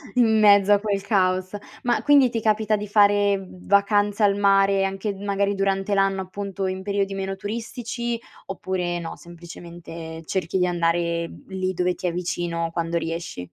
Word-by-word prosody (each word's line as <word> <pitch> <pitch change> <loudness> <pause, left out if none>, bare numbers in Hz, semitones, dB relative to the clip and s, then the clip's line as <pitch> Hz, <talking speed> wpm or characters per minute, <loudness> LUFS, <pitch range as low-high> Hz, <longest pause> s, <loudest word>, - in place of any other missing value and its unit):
in 220 -3 +4
mezzo 205 -1 +6
a 205 - +6
quel 200 -2 -1
caos. 185 -2 +1 0.3
Ma 245 -1 +1
quindi 285 -3 +5
ti 230 - -2
capita 215 0 +1
di 210 0 -5
fare 205 -1 +3 0.2
vacanza 205 +1 +2
al 200 0 +3
mare 195 -1 +3
anche 195 +2 -3
magari 200 0 -1
durante 195 +1 0
l'anno 195 -1 +2
appunto 195 0 -4
in 185 0 -3
periodi 200 0 -1
meno 195 0 -3
turistici 235 +3 -4 0.3
oppure 185 -2 -3
no, 165 -1 -7
semplicemente 170 -1 -10
cerchi 185 +1 -2
di 180 - +2
andare 170 -1 0 0.2
lì 185 -1 -2
dove 180 0 0
ti 180 - -3
è 170 - -1
vicino, 170 -1 -2
quando 170 0 -2
riesci? 165 - -4
195 Hz, 160 wpm, -23 LUFS, 175-205 Hz, 0.3 s, mezzo